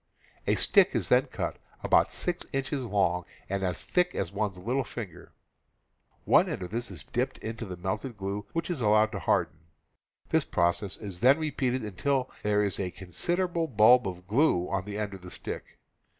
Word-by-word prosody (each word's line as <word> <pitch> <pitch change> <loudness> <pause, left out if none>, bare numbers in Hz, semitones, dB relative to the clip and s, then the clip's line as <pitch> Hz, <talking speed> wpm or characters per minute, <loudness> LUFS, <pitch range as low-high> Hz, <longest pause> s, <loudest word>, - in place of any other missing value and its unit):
A - - +4
stick - - +4
is - - 0
then - - +4
cut - - -4 0.3
about - - +4
six 175 0 -1
inches 135 0 -2
long 95 -6 +1 0.2
and 100 0 -2
as 90 -2 0
thick 180 0 +1
as 90 -2 -2
one's 100 -2 -2
little 125 +9 -1
finger; 110 -7 -9 0.9
one - - +5
end - - -4
of 90 - -7
this 120 +2 -1
is 85 -9 -6
dipped - - -2
in 110 +1 -5
the 95 -6 -6
melted 105 +7 -4
glue, 100 +1 -4
which 165 +1 -2
is 155 -7 -3
allowed 110 0 +4
to - - -4
harden; 80 - 0 0.7
this - - +3
process 85 +3 0
is 100 -5 -7
then 130 - +6
repeated 135 -5 -1
until 125 +6 -1
there 105 0 +2
is 100 -2 -1
a 95 -2 -1
considerable 170 - -1
bulb 120 -1 +6
of 90 -1 -6
glue 105 - +2
on 95 -1 -1
the 105 0 -5
end 105 -2 -3
of 95 - -9
the 90 - -9
stick. - - -6
105 Hz, 185 wpm, -28 LUFS, 95-130 Hz, 0.9 s, then